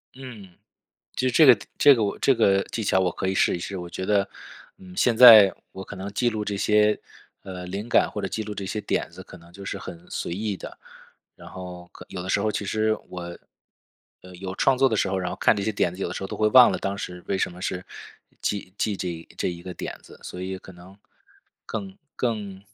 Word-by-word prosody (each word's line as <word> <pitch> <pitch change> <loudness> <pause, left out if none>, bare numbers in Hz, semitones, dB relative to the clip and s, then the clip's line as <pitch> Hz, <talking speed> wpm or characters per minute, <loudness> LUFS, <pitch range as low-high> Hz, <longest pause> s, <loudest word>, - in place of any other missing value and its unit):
嗯， 120 -8 -11 0.6
其 130 - -2
实 - - -2
这 155 +5 +6
个 130 - +10
的 105 - -13
这 145 - +8
个 115 - -1
我 100 - -1
这 135 - +3
个 100 -4 +3
技 115 - -5
巧 100 -2 +2
我 90 -1 +1
可 95 - -3
以 95 - 0
试 - - +3
一 - - -6
试。 95 +2 -5
我 90 -1 -6
觉 90 +2 -5
得， 100 0 +2 0.5
嗯， 95 -1 -13
现 120 -2 +2
在 110 -5 +10 0.2
我 95 - -8
可 - - -9
能 100 +1 -7
记 120 +4 +1
录 110 -2 -2
这 105 -1 -3
些， 105 +1 +3 0.4
呃， 90 -1 -7
灵 100 +5 -5
感 - - +3
或 105 - -5
者 100 - -2
记 110 - -3
录 105 0 -6
这 100 -1 -5
些 105 +3 -3
点 - - -2
子 - - -11
可 - - -13
能 85 +1 -18
就 100 +2 -11
是 100 - -4
很 85 -3 -10
随 - - -4
意 100 +2 -2
的， - - -10 0.6
然 - - -12
后 90 -1 -9
可 - - -12
有 90 - -6
的 95 - -7
时 100 - +2
候 110 +1 +1
其 105 - -3
实 110 +2 0
我， 85 -1 -7 0.8
呃， 90 0 -13
有 95 0 -6
创 135 - +3
作 135 +1 +4
的 110 - -1
时 100 - +1
候， 95 - -1
然 90 -1 -3
后 - - -5
看 - - +4
这 100 - -2
些 110 - 0
点 90 -4 0
子， 95 - -6
有 - - -1
的 90 - -6
时 - - -5
候 - - -2
都 - - -6
会 110 0 +3
忘 125 +1 +8
了 - - -2
当 100 0 -3
时 90 -1 -7
为 95 - 0
什 - - -1
么 90 +1 -11
是 90 -1 -3 0.6
记 100 -3 -3
记 105 -2 -1
这 90 - -3
一 85 -1 -7
这 - - 0
一 85 -1 -6
个 90 - -7
点 - - -6
子。 - - -15
所 90 - -7
以 95 0 -4
可 95 - -13
能 90 +3 -15 0.7
更 195 0 -6 0.2
更， 105 -5 -3
100 Hz, 275 characters per minute, -25 LUFS, 90-110 Hz, 0.8 s, 个